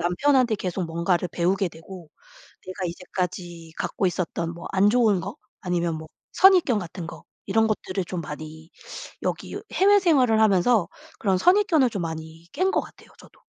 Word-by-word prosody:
남편한테 240 +6 +2
계속 185 -2 -3
뭔가를 170 +2 0
배우게 185 +3 0
되고 165 0 -12 0.5
내가 185 0 -6
이제까지 175 -1 -5
갖고 195 - -1
있었던 170 -1 -2
뭐 170 - -9
안 195 +2 +4
좋은 220 -5 +3
거 - - -7 0.2
아니면 175 -2 -1
뭐 160 0 -9 0.2
선입견 360 - +5
같은 175 -2 -7
거 170 - -10 0.2
이런 220 +3 +2
것들을 195 -3 -2
좀 175 0 -5
많이 155 +1 -9 0.5
여기 - - -3 0.2
해외 405 +2 +5
생활을 260 - +3
하면서 210 0 +3 0.3
그런 190 -3 +1
선입견을 350 - +4
좀 200 -5 -4
많이 160 0 -7
깬 375 +2 +1
것 - - +1
같아요 - - -15
저도. - - -19
185 Hz, 330 characters per minute, -24 LUFS, 170-225 Hz, 0.5 s, 선입견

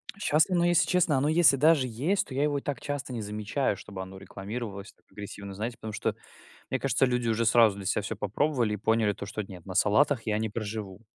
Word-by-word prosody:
А 200 - -19
щас 160 -2 +3
оно 175 -2 +2
если 175 -1 +3
честно, 180 -5 +2
оно 135 +3 +1
если 155 -3 +5
даже 150 -2 +4
есть, 145 - 0
то 130 - -8
я 140 +2 +1
его 145 -1 +1
и - - -15
так 140 -4 -3
часто 145 -2 -4
не 115 -3 -4
замечаю, 105 +4 -1
чтобы 100 0 -8
оно 95 0 -8
рекламировалось 100 +2 -7
так - - -36
агрессивно, 100 -1 -8
знаете, 110 +5 -4
потому 110 - -7
что, 105 - -2 0.5
мне - - -2
кажется, - - +2
люди 125 -2 0
уже 115 0 +1
сразу 115 -3 +5
для 100 -1 -7
себя 105 - +1
всё - - -4
попробовали 115 +1 0
и - - -2
поняли 110 0 +2
то 100 - -7
что: 105 +1 -4
"Нет, 95 -4 -11
на 95 - -6
салатах 115 +6 +3
я 105 -1 +1
не 110 0 -1
проживу". 105 -1 -5
115 Hz, 235 wpm, -28 LUFS, 105-140 Hz, 0.5 s, если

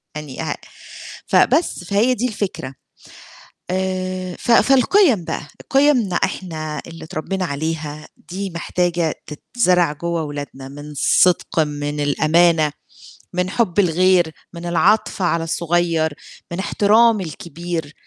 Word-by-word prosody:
يعني 150 -1 -6
أ - - -2 0.7
فبس، 330 - +2
فهي 205 +8 +2
دي 250 0 -1
الفكرة. 200 - -4 1.0
آآ 185 -1 -2
ف - - -1
فالقِيَم 265 - +4
بقى، 150 - -4 0.2
قِيَمنا 270 -9 +3
إحنا 155 -6 -3
اللي 165 0 -10
اتربّينا 185 +4 -3
عليها 155 0 -4 0.2
دي 195 +2 -4
محتاجة 170 -1 -1
تتزرع 180 0 +1
جوّه 170 +2 -2
ولادنا 145 -2 -7
من 145 +2 -9
صِدق، 175 +4 +3
من 145 -1 -1
الأمانة، 155 +2 +3 0.6
من 180 +1 0
حُب 205 -3 0
الغير، 180 -2 +3 0.2
من 170 0 -8
العَطْف 195 +4 +2
على 170 -2 +1
الصغيّر، 165 -1 0 0.4
من 170 - -4
احترام 215 +2 +3
الكبير. 165 -1 -5
175 Hz, 115 wpm, -20 LUFS, 155-190 Hz, 1.0 s, فالقِيَم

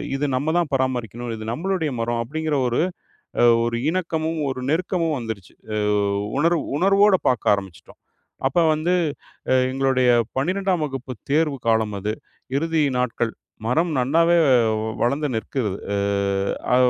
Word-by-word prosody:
இது 145 - -1
நம்ம 150 +5 0
தான் 165 -4 0
பராமரிக்கனும், 120 -3 -1
இது 110 - -7
நம்மளுடைய 170 +2 -1
மரம் 115 0 -1
அப்டிங்குற 155 +4 -2
ஒரு 120 - 0 0.6
அ - - +6 0.2
ஒரு 115 0 -1
இணக்கமும், 165 -3 -2
ஒரு 130 -1 -3
நெருக்கமும் 165 -1 0
வந்துருச்சு. 110 -6 -7 0.2
அ - - -1 0.6
உணர்வு 165 0 +2 0.2
உணர்வோட 195 +1 +5
பாக்க 125 -4 0
ஆரம்பிச்சுட்டோம். 95 -3 -9 0.5
அப்ப 135 - -2 0.2
வந்து 165 +4 0 0.6
அ - - +5 0.2
எங்களுடைய 130 -1 +2 0.3
12ஆம் 185 +2 0
வகுப்பு 135 -2 -6 0.2
தேர்வு 150 -2 +2
காலம் 110 -2 +2
அது. 105 +2 -2 0.4
இறுதி 160 +1 +1 0.2
நாட்கள். 120 -2 -1 0.3
மரம் 160 +8 +1
நல்லாவே 165 +7 +3 0.7
வளர்ந்து 140 +5 +1
நிற்கிறது. 110 -2 -2 0.2
அ - - +1 0.8
அ - - +5
140 Hz, 130 wpm, -22 LUFS, 120-165 Hz, 0.8 s, அ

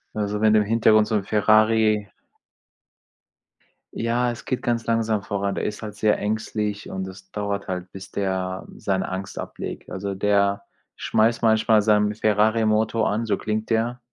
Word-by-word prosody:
Also, 105 0 -2
wenn 110 0 +5
im 105 - +5
Hintergrund 110 0 +4
so 110 - 0
'n 105 - 0
Ferrari 110 0 +3 1.8
Ja, 120 +2 0
es 120 - -9
geht 130 - -2
ganz 120 -1 -1
langsam 115 -2 0
voran. 100 -1 -2
Der - - -3
ist 105 - -4
halt 105 -2 -7
sehr 105 0 +2
ängstlich 105 -1 -3
und 95 0 -4
es 95 0 -12
dauert 100 -1 -3
halt, 90 -1 -5
bis 95 0 -10
der 95 -1 -2
seine 95 -1 -2
Angst 95 +1 -5
ablegt. - - -7
Also, 100 +1 -4
der 100 0 +1 0.3
schmeißt 115 +1 +1
manchmal 110 -1 +4
seinen 105 0 +2
Ferrari-Motor 110 +1 +2
an, 110 +3 -1
so 110 - +1
klingt 110 0 -3
der, 115 +2 0
105 Hz, 155 wpm, -23 LUFS, 100-110 Hz, 1.8 s, wenn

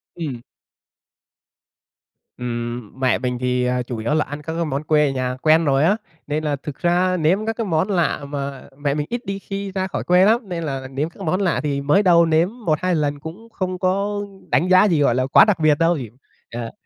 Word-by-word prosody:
Ừm. 145 -8 -5 2.0
Ừm, 120 -1 -5
mẹ 130 -3 +2
mình 125 -1 -2
thì 125 0 0 0.2
chủ 120 - -4
yếu 110 +6 -1
là 150 -1 +2
ăn 145 +2 -7
các 160 +2 -5
cái 170 0 -1
món 140 -1 -3
quê 150 -1 +3
ở - - 0
nhà 130 -1 -2
quen 160 +1 +4
rồi 135 -1 +3
á 195 +7 +3 0.3
nên 155 +1 -2
là 150 -2 0
thực 140 0 -8
ra 180 +1 +2
nếm 180 +6 +1
các 225 - -1
cái 230 - -1
món 165 +2 0
lạ 175 -6 0
mà 140 -2 -5
mẹ 145 -1 -1
mình 150 0 -2
ít 240 +1 -4
đi 195 0 -4
khi 195 0 -5
ra 190 0 -2
khỏi - - -4
quê 180 +1 +4
lắm 225 0 +2
nên 170 -2 -3
là 135 -3 -4
nếm 140 +4 -3
các - - -28
cái 195 - -6
món 185 +5 0
lạ 185 -4 +1
thì 140 -2 -1
mới 150 +9 +3
đầu 170 -3 +5
nếm 165 +2 +2 0.2
1-2 175 +3 +1
lần 145 -2 -1
cũng 175 +10 -10
không 185 -4 -4
có 200 +2 0 0.3
đánh 175 - +2
giá 185 0 +7
gì 165 -5 +2
gọi 120 -4 +3
là 130 0 +1
quá 140 - +7
đặc 210 -5 +1
biệt 155 -2 +3
đâu, 165 0 +3 0.5
ờ, 115 -1 -5
155 Hz, 225 wpm, -21 LUFS, 140-185 Hz, 2.0 s, giá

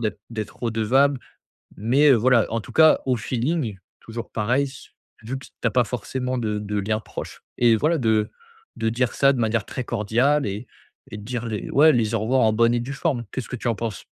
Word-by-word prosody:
d'être 110 -3 -3
d'être 110 0 -6
redevable. 125 +5 +2 0.6
Mais, 130 +8 +3
heu, 135 - +7
voilà, 120 0 +3
en 115 - 0
tout - - -12
cas, 160 -1 +6
au 130 -1 +2
feeling, 120 - -2 0.2
toujours 115 +1 -7
pareil, 120 +6 +1
s 135 -1 -11 0.3
vu 130 +4 -4
que - - -13 0.2
t'as 115 - +2
pas 125 0 +3
forcément 125 +2 -3
de 105 -3 -2
de 105 0 -3
liens 110 +2 -1
proches, - - -8 0.2
et 120 -2 +5
voilà, 160 +8 +1
de 110 -5 +1 0.5
de 115 - -1
dire 120 +1 0
ça 135 0 +4
de 130 - -3
manière 110 -2 0
très 130 - -5
cordiale 125 +8 +1
et 105 +4 -5 0.5
et - - -6
de 105 - -10
dire 120 +1 -4
les 110 -2 -4
ouais, 155 +3 +6
les 115 -4 +1
au - - +1
revoir 125 +4 +2
en 110 -1 +3
bonne 115 +2 +3
et 120 - +1
due 130 +4 -5
forme. 135 -4 -1
Qu'est-ce 130 - -5
que - - -4
tu 120 - -4
en 115 - +1
penses? 110 -3 -5
120 Hz, 220 wpm, -23 LUFS, 110-130 Hz, 0.6 s, heu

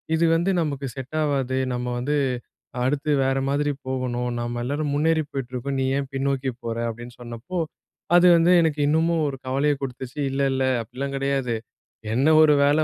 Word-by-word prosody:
இது 165 +1 +2
வந்து 170 +4 +1
நமக்கு 140 -3 -2
செட் 135 +3 -6
ஆவாது, 135 -3 0 0.2
நம்ம 125 0 -3
வந்து 145 +4 0 0.7
அடுத்து 145 +3 0
வேற 135 0 +1
மாதிரி 145 +1 +1 0.2
போகணும் 125 -2 -2
நம்ம 120 0 -3
எல்லாரும் 145 +3 -2
முன்னேறி 160 +2 +2
போயிட்டுருக்கோம், 130 +1 -4
நீ - - +1
ஏன் 135 -1 -3
பின்னோக்கி 135 0 -1
போற? 115 -1 -3
அப்படின்னு 120 +1 -8
சொன்னப்போ. 120 +9 -6 0.6
அது 175 +1 +7
வந்து 170 +2 +4
எனக்கு 155 -2 0
இன்னமும் 160 +1 +2
ஒரு 135 -2 -4
கவலையை 140 +3 +2
கொடுத்துச்சு, 130 +1 -6
இல்ல 135 +1 -2
இல்ல 130 0 0 0.2
அப்படிலாம் 130 +5 -5
கிடையாது, 135 -3 0 0.6
என்ன 130 +6 +2
ஒரு 155 -1 +6
வேலை 145 +2 +4
135 Hz, 165 wpm, -24 LUFS, 125-150 Hz, 0.7 s, அது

